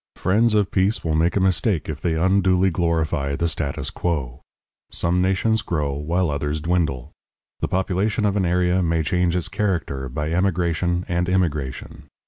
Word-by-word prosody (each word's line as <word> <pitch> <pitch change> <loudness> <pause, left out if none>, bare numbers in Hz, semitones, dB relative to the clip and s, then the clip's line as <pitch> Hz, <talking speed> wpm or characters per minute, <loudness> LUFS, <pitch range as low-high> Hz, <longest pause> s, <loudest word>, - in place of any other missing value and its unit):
Friends 105 +4 +2
of 105 -2 +2
peace 95 +4 +1
will 80 - -1
make 80 +3 +2
a - - +3
mistake 95 -1 +1
if 75 -2 -5
they 85 -1 0
unduly 95 +2 +3
glorify 80 -4 0
the 85 - 0
status 75 -4 -3
quo. 70 -9 -3 0.5
Some 90 +1 0
nations 100 +4 +1
grow, 75 -9 -2
while 80 +4 -1
others 75 +1 -2
dwindle; 80 -6 -1 0.5
the - - -1
population 95 +3 0
of 100 -1 +1
an 100 - +1
area 90 +1 +2
may 85 -2 +1
change 90 +2 +1
its 90 - 0
character 80 -10 -2
by 75 +5 -3
emigration 90 -1 0
and 85 0 0
immigration. 75 -8 -2
85 Hz, 160 wpm, -22 LUFS, 80-95 Hz, 0.5 s, a